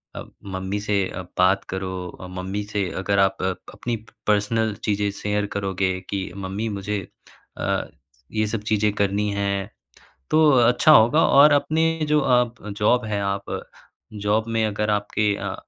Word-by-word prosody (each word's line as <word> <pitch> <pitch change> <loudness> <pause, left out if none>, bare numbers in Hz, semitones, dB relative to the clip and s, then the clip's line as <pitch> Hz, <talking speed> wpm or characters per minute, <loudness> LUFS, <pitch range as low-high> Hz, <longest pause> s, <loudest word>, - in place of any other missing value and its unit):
अ, - - -5 0.2
mummy 95 +1 -3
से 105 0 -1
अ, 95 - -6 0.2
बात 95 +2 +3
करो। 95 0 -3 0.3
अ, 95 - -7
मम्मी 95 +3 -4
से 100 -3 0
अगर 100 +1 +1
आप 95 0 +3
प 95 0 0 0.2
अपनी 120 -1 -3 0.3
पर्सनल 105 +1 +1
चीज़ें 105 -1 0
शेयर 105 0 -2
करोगे। 95 -2 -1
कि 95 -3 -3
मम्मी 100 +3 -4
मुझे 105 0 -3 0.6
अ, - - -1 0.5
ये 110 0 0
सब 105 0 -3
चीज़ें 105 0 +2
करनी 100 0 0
हैं। 100 0 -1 0.6
तो 160 +1 +5 0.2
अच्छा 125 +5 +5
होगा 150 +3 +6
और 145 +2 +7
अपने 155 +3 +2 0.2
जो 150 0 +3
आप 125 -3 +1
जॉब 115 +3 +2
है 105 -2 -2
आप। 100 0 -3 0.5
जॉब 105 +1 0
में 115 -1 +1
अगर 105 0 -1
आपके 105 0 +1
अ, - - -4
105 Hz, 155 wpm, -23 LUFS, 100-110 Hz, 0.6 s, और